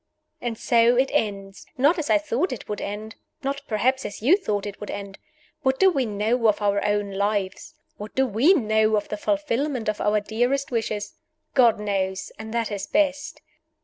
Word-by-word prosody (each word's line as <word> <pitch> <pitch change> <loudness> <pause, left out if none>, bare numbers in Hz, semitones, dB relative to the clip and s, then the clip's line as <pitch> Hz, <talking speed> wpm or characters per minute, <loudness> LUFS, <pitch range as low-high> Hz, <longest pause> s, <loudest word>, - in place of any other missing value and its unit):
And 235 -2 -3
so 235 +1 +4
it 260 +2 +2
ended! 195 -2 -1 0.2
Not 295 +7 +3
as 300 - -3
I - - +6
thought 310 +3 -1
it 255 - -6
would 210 - -4
end; 215 +2 -5 0.3
not 280 +1 -2
perhaps 255 +4 +1
as 205 - -6
you 275 - +5
thought 210 - -2
it 205 -1 -7
would 210 - -7
end. 200 -1 -7 0.4
What 265 -2 +1
do 380 0 +6
we 270 -7 0
know 220 +3 +1
of 210 - +3
our 200 -1 +1
own 205 -1 0
lives? 200 -1 -2 0.2
What 210 +1 -9
do 265 - +3
we 255 - +4
know 220 -5 +2
of 205 - -2
the - - -2
fulfillment 290 -1 -1
of 215 0 -1
our 210 0 +2
dearest 245 +7 -1
wishes? 215 -3 -2 0.4
God 240 -5 +5
knows 195 -2 -2
and 220 0 -7
that 230 -1 -1
is 200 -1 -4
best. 290 -2 0
220 Hz, 190 wpm, -24 LUFS, 205-265 Hz, 0.4 s, I